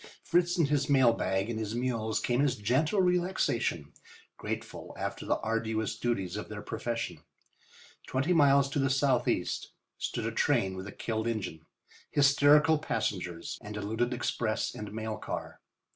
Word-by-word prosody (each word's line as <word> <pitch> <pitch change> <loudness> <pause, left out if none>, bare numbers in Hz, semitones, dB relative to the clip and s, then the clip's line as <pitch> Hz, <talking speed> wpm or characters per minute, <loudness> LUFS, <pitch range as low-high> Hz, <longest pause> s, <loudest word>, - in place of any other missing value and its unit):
Fritz 175 +1 +2
and 165 -4 +3
his 145 -1 +1
mail 130 -4 +5
bag 95 -2 0
and 115 -2 -3
his 110 0 -3
mules 115 -3 -1
came 120 +2 +1
as 140 -3 +2
gentle 130 - +1
relaxation, 175 - 0 0.4
grateful - - -6
after - - -4
the - - +2
arduous 110 -1 -1
duties 110 -6 -2
of - - -5
their - - -6
profession. 115 -1 -3 0.9
Twenty 135 +7 +1
miles 140 -3 +5
to 145 - -1
the 135 -1 +2
southeast 135 -2 +1 0.3
stood - - -3
a - - -1
train 95 -1 +1
with 95 +1 -6
a - - -7
killed 110 +1 -3
engine, 95 -8 -4 0.4
hysterical 145 +2 +5
passengers 90 - -3
and 105 0 -7
a - - -3
looted 110 +4 -1
express 120 -3 -1
and 105 -1 -7
mail 110 0 -4
car. - - -6
120 Hz, 155 wpm, -30 LUFS, 110-140 Hz, 0.9 s, mail